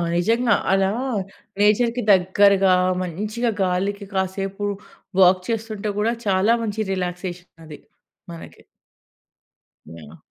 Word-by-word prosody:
నిజంగా 230 +6 +2 0.2
అలా 195 0 +2 0.7
నేచర్‌కి 230 +4 +2
దగ్గరగా 195 +1 +4 0.3
మంచిగా 210 +7 -3
గాలికి 195 +3 -2
కాసేపు 195 +1 -3 0.6
వాక్ 185 0 +5
చేస్తుంటే 215 -2 -3
కూడా 225 +2 +1
చాలా 200 +4 +3
మంచి 215 -2 -3
రిలాక్సేషన్ 180 -1 -5
అది 150 -2 -11 0.5
మనకి. 165 - -11 1.3
యాహ్! 80 -1 -12
195 Hz, 95 wpm, -22 LUFS, 185-215 Hz, 1.3 s, వాక్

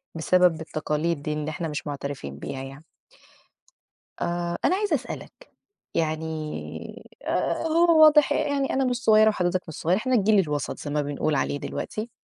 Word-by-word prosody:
بسبب 175 0 +3
التقاليد 155 0 -2
دي 155 - -2
اللي 150 0 -3
إحنا 165 +2 -4
مش 150 0 -5
مُعترفين 140 - -5
بيها 135 0 -5
يعني. 135 +3 -10 1.4
آآ 175 0 -2
أنا 370 - +4
عايزة 400 -4 +1
أسألك، 270 - -8 0.4
يعني 160 0 -1 1.0
آآ - - -1
هو 330 0 +5
واضح 300 -1 +6
يعني 280 -1 0
أنا 270 0 +1
مش 250 -1 +1
صغيرة 215 -1 +6
وحضرتك 185 -3 0
مش 160 - -7
صغير، 175 +5 +1
إحنا 255 +4 0
الجيل 210 -1 +4
الوَسط 150 -6 -2
زي 145 - -5
ما 150 0 +1
بنقول 145 +1 -1
عليه 140 +1 -1
دلوقتي. 215 +9 -5
170 Hz, 155 wpm, -25 LUFS, 150-240 Hz, 1.4 s, واضح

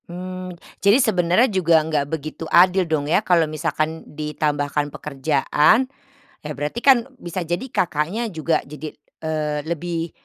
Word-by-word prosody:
Mmm, 185 0 -7 0.2
jadi 200 +4 +5
sebenarnya 210 -2 +3
juga 170 -3 +4
enggak 150 -3 -1
begitu 155 +1 -5
adil 185 +2 +5
dong 155 -2 0
ya 160 +7 +2
kalau 175 -5 +3
misalkan 155 +1 -2 0.2
ditambahkan 150 -1 -1
pekerjaan. 150 - +2 0.6
Ya 150 - -5
berarti 150 +11 -3
kan 265 -3 +5
bisa 175 -4 -5
jadi 175 +8 -3
Kakaknya 175 +8 -1
juga 165 -3 0
jadi, 150 +1 -7 0.3
eee, 150 -2 -2
lebih 170 0 -3
160 Hz, 135 wpm, -22 LUFS, 150-185 Hz, 0.6 s, jadi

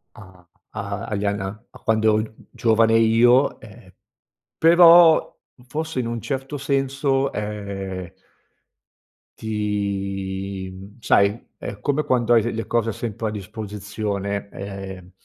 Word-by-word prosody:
a 95 -3 -15 0.3
a - - -5
agli 105 0 -2
ann 100 +1 0
a 95 0 -3 0.2
a - - -15
quando 110 0 +1
ero 110 0 +3
gi 110 0 -12
giovane 115 0 +3
io. 120 +4 +4
Ehm, - - -15 0.7
però 170 0 +7 0.3
forse 155 0 -3
in 120 - -1
un 115 -1 -4
certo 135 +3 -4
senso, 135 0 0
ehm 100 -3 -5 1.3
ti, 100 -2 -3
mhmm 100 +5 -13
sai, 100 +1 +3 0.2
è - - -7
come 145 +1 0
quando 120 -4 +1
hai 115 - +5
le 120 - -2
le 115 0 -4
cose 115 -1 0
sempre 110 +1 -4
a - - -3
disposizione, 100 -1 -4
ehm 95 -2 -8
110 Hz, 130 wpm, -22 LUFS, 100-120 Hz, 1.3 s, però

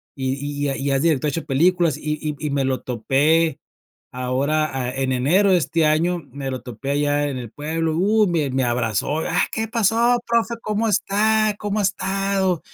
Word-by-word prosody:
y 130 -1 -2
y 145 +1 -5
y - - +1
ya 140 -1 -1
y 135 - -5
ya 140 - +2
es - - -1
director, 155 -4 +2
ha - - -3
hecho 165 +3 -4
películas, 165 +2 +2
y 150 0 -3
y 150 -1 -3
y - - -3
me 140 -1 0
lo 130 -1 -1
topé. 145 +6 +1 0.6
Ahora, 140 +5 0
ah, 125 -2 -2
en 135 -1 -1
enero 175 +11 +3
de - - +6
este 165 0 +1
año 165 +4 +2
me 135 0 -5
lo 130 -1 -4
topé 125 +2 -6
allá 145 0 +1
en 135 -2 -4
el 120 -3 -7
pueblo, 160 +3 -2
uh, 210 +4 +3
me 160 -5 0
me 130 0 0
abrazó: 120 +4 -1
"Ah 165 +2 0
¿qué 220 0 -2
pasó 230 +2 +2
profe? 235 0 +1
¿Cómo 215 +1 -1
está? 215 +1 +2
¿Cómo 205 0 -2
ha - - +1
estado?". 190 -2 0
155 Hz, 205 wpm, -21 LUFS, 135-195 Hz, 0.6 s, de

